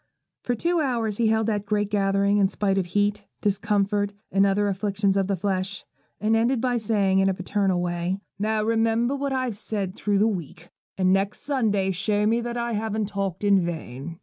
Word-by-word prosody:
For 245 - -1
two 340 +8 0
hours 230 -7 -1
he 230 - +2
held 220 0 +2
that 205 -2 -1
great 210 -1 0
gathering, 200 0 +2
in 195 -1 +4
spite 195 -1 0
of 180 - -2
heat, 205 +2 0
discomfort, 205 0 0 0.2
and 195 +1 +4
other 205 +1 +2
afflictions 200 0 0
of 195 -1 +1
the 200 - +1
flesh, 190 +1 -3 0.3
and 215 +1 +2
ended 235 +3 +2
by 245 0 +1
saying, 200 -4 +2
in 195 0 +3
a 190 - 0
paternal 190 0 0
way, 175 +1 -1 0.2
'Now 215 +1 0
remember 230 +3 +1
what 280 0 -2
I've 255 -5 -1
said 200 -4 -3
through 205 0 0
the 210 +3 +4
week, 175 -4 -5 0.3
and 185 -1 +3
next 195 +1 0
Sunday 215 -9 +1
show 205 +3 0
me 230 +2 +2
that 240 0 -4
I 235 0 -2
haven't 215 -1 -2
talked 195 -2 -3
in 200 -2 +4
vain.' 160 -2 -5
205 Hz, 195 wpm, -25 LUFS, 195-220 Hz, 0.3 s, in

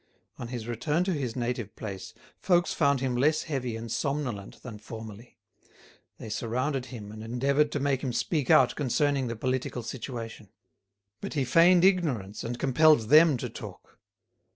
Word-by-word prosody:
On 120 - -5
his 120 -2 -6
return 150 +8 0
to 185 0 -1
his 130 -7 -3
native 120 -3 -3
place, 100 -4 -7 0.2
folks 175 -2 +2
found 140 -4 +2
him 130 -2 -1
less 150 +5 +2
heavy 130 -6 -3
and 115 0 -7
somnolent 135 -9 -3
than 110 -4 -8
formerly. 110 +1 -10 0.8
They - - -9
surrounded 125 +5 -2
him 105 -5 -9
and 110 0 -9
endeavoured 140 +6 +1
to 145 - -1
make 135 -1 0
him 130 - -2
speak 140 +3 -1
out 130 - +6
concerning 140 -1 0
the 115 - -4
political 130 +1 -2
situation. 115 -4 -7 0.7
But - - -5
he 140 -3 +1
feigned 170 +6 +5
ignorance 140 - +1
and 120 +1 -4
compelled 135 -3 +4
them 155 -1 +7
to - - -4
talk. - - -11
125 Hz, 160 wpm, -28 LUFS, 115-145 Hz, 0.8 s, them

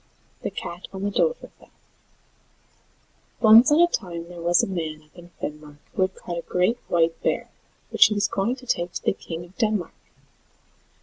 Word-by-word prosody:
THE - - -2
CAT 175 +2 -7
ON 190 0 -6
THE 205 - -1
DOVREFELL 480 - -2 1.7
Once 225 +4 +8
on 305 +3 +5
a 345 - +7
time 175 - -4
there 175 -1 -9
was 175 +1 +3
a - - 0
man 160 -5 -4
up 155 - -29
in 175 -1 -13
Finnmark 150 -1 -7 0.2
who - - -2
had 185 0 +1
caught 175 -1 -5
a - - -5
great 180 +8 0
white 165 -1 +1
bear, - - -1 0.4
which - - +7
he 210 - -2
was 205 - +2
going 210 +6 -1
to 255 -1 -14
take 175 -7 -1
to - - -5
the - - +2
King 170 -3 -7
of 180 +2 -20
Denmark. 215 -7 0
180 Hz, 185 wpm, -24 LUFS, 170-215 Hz, 1.7 s, Once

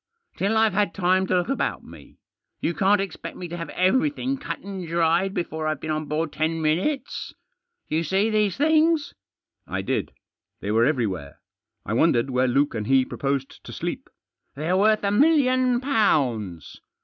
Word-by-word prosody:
" 465 - -47
Till 205 +3 +1
I've 220 -2 +3
had 205 -3 0
time 185 0 +2
to 185 - +2
look 175 - -1
about 275 - -1
me. - - -15 0.4
You 170 - -1
can't 195 +3 +3
expect 195 -1 -5
me 180 - -6
to 170 - -5
have 170 -1 -6
everything 260 +7 +1
cut 270 - -5
and 190 -3 -7
dried 170 +3 +2
before 160 -2 -3
I've 155 -2 -1
been 155 - -4
on 155 0 -2
board 155 +1 -2
ten 160 +1 -1
minutes. 175 - -1 0.5
You 160 - 0
see 195 +7 +1
these 210 -3 +1
things?" 315 +1 +2 0.5
I - - -3
did. - - -2 0.5
They 100 - -3
were 115 +2 +4
everywhere. 105 - -2 0.5
I - - -3
wondered 130 -1 +2
where 130 0 +2
Luke 140 +4 +2
and 110 -2 -4
he 135 -1 +4
proposed 135 0 -3
to - - -9
sleep. - - -5 0.2
" - - -52
They're 160 +6 -1
worth 215 +2 +3
a 200 - +1
million 255 -1 +3
pounds." 130 - 0
175 Hz, 175 wpm, -24 LUFS, 145-215 Hz, 0.5 s, were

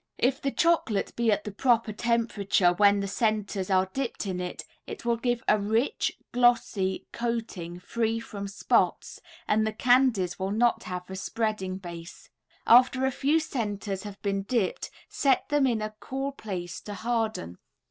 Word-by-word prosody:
If 265 +3 +1
the 275 - 0
chocolate 325 - +1
be 235 -1 +2
at 205 0 +1
the 210 - -5
proper 230 0 +2
temperature 210 -5 +2
when 200 +1 +4
the 200 - -2
centers 205 -2 -1
are 190 0 +3
dipped 265 -5 -3
in 185 -2 -3
it, 180 0 -5 0.2
it 410 - -8
will 235 0 +2
give 240 0 -1
a 210 - +4
rich, 220 +6 0
glossy 235 -6 +2
coating 225 -8 -4
free 225 +4 -1
from 200 -3 -6
spots, 195 - 0 0.3
and 215 +1 +3
the - - 0
candies 235 -6 +2
will 190 0 -1
not 230 +3 +1
have 180 0 -5
a - - -4
spreading 195 -2 -2
base. 170 -2 -10 0.3
After 255 +2 +6
a 265 - +1
few 290 +5 +2
centers 205 -9 -3
have 205 -1 -9
been 195 -1 0
dipped 200 -1 -1 0.2
set 270 -3 +1
them 290 -2 +3
in 225 -4 0
a 215 0 -4
cool 270 +1 -3
place 185 -9 -6
to 205 - -7
harden. 220 - -2
215 Hz, 165 wpm, -27 LUFS, 195-240 Hz, 0.3 s, After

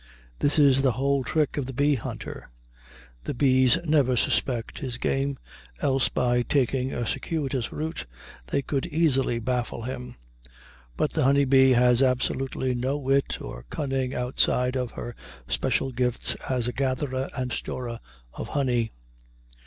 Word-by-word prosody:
This 145 - +2
is 140 -3 +5
the 130 -3 +3
whole 135 +3 +1
trick 150 +3 0
of 140 -3 -1
the 135 - -6
bee 145 +2 +3
hunter. 125 - -6 0.8
The - - -3
bees 130 -2 +4
never 140 -5 +3
suspect 120 0 0
his 125 -4 -4
game, 135 +2 -1 0.4
else 135 -2 +2
by 120 -1 +1
taking 130 0 +1
a 120 - -2
circuitous 135 -2 -2
route 160 - -4 0.4
they 140 - 0
could 135 +3 -2
easily 145 -7 +2
baffle 120 0 -2
him. 125 0 -6 0.8
But 150 - 0
the 160 - +1
honey 140 +1 +4
bee 130 0 +6
has 125 0 +4
absolutely 130 0 0
no 130 +4 -1
wit 135 0 0
or - - -8
cunning 135 -3 -2
outside 125 0 +1
of 125 -3 -2
her 120 -1 -6 0.3
special 130 - 0
gifts 125 -1 +1 0.2
as 125 -3 0
a 125 - -2
gatherer 130 0 -1
and 125 -1 -2
storer 120 -2 -4 0.3
of - - -6
honey. 125 -5 0
130 Hz, 145 wpm, -26 LUFS, 125-140 Hz, 0.8 s, bee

